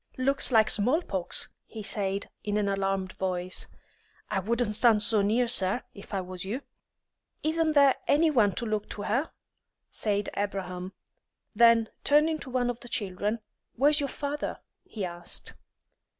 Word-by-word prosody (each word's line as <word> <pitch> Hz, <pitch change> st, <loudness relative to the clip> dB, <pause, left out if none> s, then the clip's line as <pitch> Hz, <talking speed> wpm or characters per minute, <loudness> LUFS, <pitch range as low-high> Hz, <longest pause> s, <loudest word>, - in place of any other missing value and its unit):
"Looks 275 Hz, +1 st, +2 dB
like 220 Hz, -2 st, +5 dB
small 255 Hz, -, +2 dB
pox," 185 Hz, -, -1 dB, 0.2 s
he 220 Hz, -2 st, -8 dB
said, 200 Hz, -1 st, -2 dB, 0.2 s
in 205 Hz, 0 st, -1 dB
an 210 Hz, -1 st, +1 dB
alarmed 195 Hz, -1 st, -1 dB
voice. 185 Hz, -1 st, -2 dB, 0.6 s
"I 195 Hz, -, +1 dB
wouldn't 225 Hz, +2 st, 0 dB
stand 220 Hz, -1 st, +5 dB
so 210 Hz, 0 st, +3 dB
near, 225 Hz, +5 st, +2 dB
sir, 200 Hz, 0 st, +1 dB
if 200 Hz, -, -12 dB
I 195 Hz, -2 st, -1 dB
was 180 Hz, -1 st, -5 dB
you." 225 Hz, +9 st, -4 dB, 0.8 s
"Isn't 315 Hz, 0 st, +1 dB
there 280 Hz, -2 st, +5 dB
any 315 Hz, +2 st, +4 dB
one 215 Hz, -8 st, +3 dB
to 235 Hz, -, -3 dB
look 215 Hz, -1 st, -2 dB
to 205 Hz, -, -6 dB
her?" 260 Hz, +11 st, 0 dB, 0.6 s
said 205 Hz, -1 st, -1 dB
Abraham. 185 Hz, -2 st, -3 dB, 0.6 s
Then 230 Hz, -1 st, +5 dB, 0.2 s
turning 305 Hz, +2 st, +4 dB
to 270 Hz, -, -8 dB
one 245 Hz, -1 st, +1 dB
of 240 Hz, -, -10 dB
the 240 Hz, -, -11 dB
children, 205 Hz, +2 st, -2 dB, 0.3 s
"Where's 290 Hz, +4 st, +4 dB
your 280 Hz, -1 st, -1 dB
father?" 290 Hz, +1 st, -4 dB, 0.3 s
he 205 Hz, -4 st, -5 dB
asked. 175 Hz, -1 st, -2 dB
215 Hz, 155 wpm, -28 LUFS, 195-255 Hz, 0.8 s, like